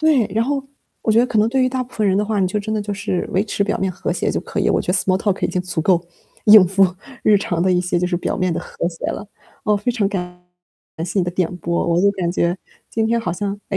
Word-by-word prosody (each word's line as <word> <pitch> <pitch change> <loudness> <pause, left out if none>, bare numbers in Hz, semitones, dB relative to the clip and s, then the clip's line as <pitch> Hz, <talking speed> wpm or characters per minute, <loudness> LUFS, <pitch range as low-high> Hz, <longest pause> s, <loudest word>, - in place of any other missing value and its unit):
对， 305 -8 +4
然 225 +1 +2
后， 275 +1 -1 0.4
我 220 - +2
觉 220 - +4
得 245 - +4
可 235 -3 0
能 215 +1 +4
对 260 +2 +1
于 255 - +3
大 255 0 -2
部 250 - -13
分 215 - +1
人 190 -1 +3
的 205 - +2
话， 210 -1 -1
你 185 - +3
就 200 +3 -1
真 215 +1 -3
的 215 - 0
就 205 - -4
是 195 -3 -2
维 190 +3 +2
持 205 -1 -1
表 205 +1 -1
面 190 0 0
和 180 - -3
谐 - - -1
就 - - -1
可 - - -6
以， - - +2
我 - - +2
觉 - - -8
得 180 - +2
small 185 0 +2
talk 195 -1 -1
已 - - +1
经 180 - -1
足 180 -2 -3
够 175 +1 +2 0.4
应 210 -3 +9
付 195 +2 +4 0.4
日 210 - +5
常 175 -3 -1
的 185 - +2
一 180 - +3
些 180 0 0
就 180 - 0
是 180 -1 0
表 175 - -2
面 185 -1 0
的 - - -2
和 - - -3
谐 165 -2 -6
了。 210 - -4 0.4
哦， 210 -1 +3
非 210 +5 -1
常 215 -5 +1
感 180 -2 -5 0.6
谢 185 +3 -2
你 185 - +2
的 175 - -2
点 180 -1 -1
拨， 170 0 -1
我 170 0 +2
就 200 +1 +4
感 180 -4 -2
觉 175 0 0 0.3
今 225 -1 0
天 230 +1 +1
好 180 -6 -2
像， 200 +3 -2 0.2
诶， 195 - -1
195 Hz, 350 characters per minute, -20 LUFS, 180-215 Hz, 0.6 s, 应